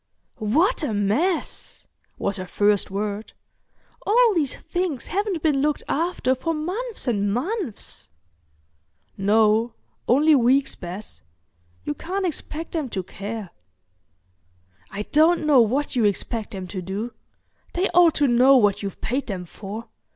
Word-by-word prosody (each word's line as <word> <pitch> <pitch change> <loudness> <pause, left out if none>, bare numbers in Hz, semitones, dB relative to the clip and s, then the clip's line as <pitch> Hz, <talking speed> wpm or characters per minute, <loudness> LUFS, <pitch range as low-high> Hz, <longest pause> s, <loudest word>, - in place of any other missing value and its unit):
"What 305 - +2
a 245 -9 -1
mess!" 240 - -1 0.3
was 200 - -1
her 185 -1 -6
first 205 +1 +2
word. 205 +2 -4 0.7
"All 460 +1 +4
these 300 -7 0
things 350 -8 -3
haven't 390 -4 -2
been 295 -4 +2
looked 300 0 0
after 320 -5 0
for 325 +5 -2
months 395 - -4
and 205 -4 +1
months." 310 - -4 1.1
"No, 220 +3 +3 0.3
only 295 +6 +5
weeks, 270 +1 +3
Bess. 180 - -8 0.6
You 145 - -2
can't 375 - -3
expect 325 -1 -4
them 310 -6 -2
to 190 -4 -3
care." 200 +1 -6 1.4
"I 205 - -4
don't 315 +6 +3
know 285 -5 +6
what 260 +6 0
you 235 -3 +3
expect 210 +2 -1
them 190 -2 -6
to 185 0 -4
do. 200 +6 -4 0.6
They 365 +3 +1
ought 345 -2 +5
to 285 - +3
know 255 +2 +6
what 205 -5 +3
you've 200 -2 -6
paid 265 +4 -2
them 185 -4 -4
for. 205 +6 -8
250 Hz, 135 wpm, -23 LUFS, 205-320 Hz, 1.4 s, know